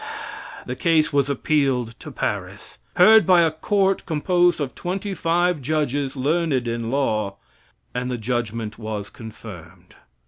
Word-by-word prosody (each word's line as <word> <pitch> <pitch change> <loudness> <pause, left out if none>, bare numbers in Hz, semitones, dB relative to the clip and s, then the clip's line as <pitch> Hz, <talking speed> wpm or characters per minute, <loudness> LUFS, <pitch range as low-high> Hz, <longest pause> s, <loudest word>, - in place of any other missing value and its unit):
The 125 - -4
case 160 0 +2
was 140 -1 +2
appealed 135 -4 0
to - - -9
Paris; - - -5 0.2
heard 215 +4 +7
by 180 -2 +6
a 165 - +2
court 195 +4 +1
composed 175 +2 +2
of 140 -3 -3
twenty 195 +3 -4
five 175 -2 +1
judges 145 -1 -1
learned 140 -2 0
in 115 -1 -2
law, 110 -7 0 0.6
and 125 0 -2
the 125 - -2
judgment 115 -2 -3
was 110 -2 -5
confirmed. 95 -6 -11
140 Hz, 135 wpm, -22 LUFS, 115-170 Hz, 0.6 s, heard